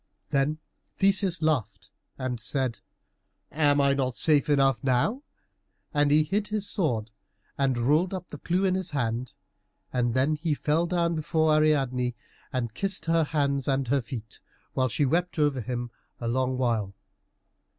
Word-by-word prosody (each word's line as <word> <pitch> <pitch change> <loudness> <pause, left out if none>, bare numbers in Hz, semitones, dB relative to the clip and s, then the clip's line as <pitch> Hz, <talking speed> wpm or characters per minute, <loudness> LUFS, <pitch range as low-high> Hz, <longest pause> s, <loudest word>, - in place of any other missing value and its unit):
Then 140 +2 +1 0.4
Theseus 195 -4 +2
laughed 150 -8 -1 0.3
and 130 -2 -3
said, 125 +1 -2 0.7
"Am 145 -2 +3
I 140 0 +4
not 130 -3 -1
safe 150 -2 +3
enough 135 -1 +3
now?" 135 - +1 0.7
And 145 -1 +3
he 150 +1 +5
hid 200 +7 -1
his 210 -1 -2
sword, 120 - -1 0.4
and 135 -3 +1
rolled 150 +9 +2
up 185 -2 -6
the 150 - -9
clue 185 +3 0
in 185 - +2
his 185 -1 -2
hand, 125 -4 -2 0.6
and 120 -2 0
then 135 +4 +2
he 155 0 -1
fell 155 +4 +1
down 170 -1 +1
before 155 0 +1
Ariadne 135 -5 +2 0.4
and 120 -5 -2
kissed 195 +7 -2
her 165 -1 +3
hands 140 -3 0
and 135 -2 0
her 140 +1 +2
feet, 115 -3 -8 0.3
while 130 -1 +1
she 115 +6 +1
wept 170 +6 0
over 145 -4 +2
him 120 +1 -4 0.3
a 120 - -3
long 130 +2 0
while. 115 -6 0
140 Hz, 155 wpm, -27 LUFS, 125-160 Hz, 0.7 s, he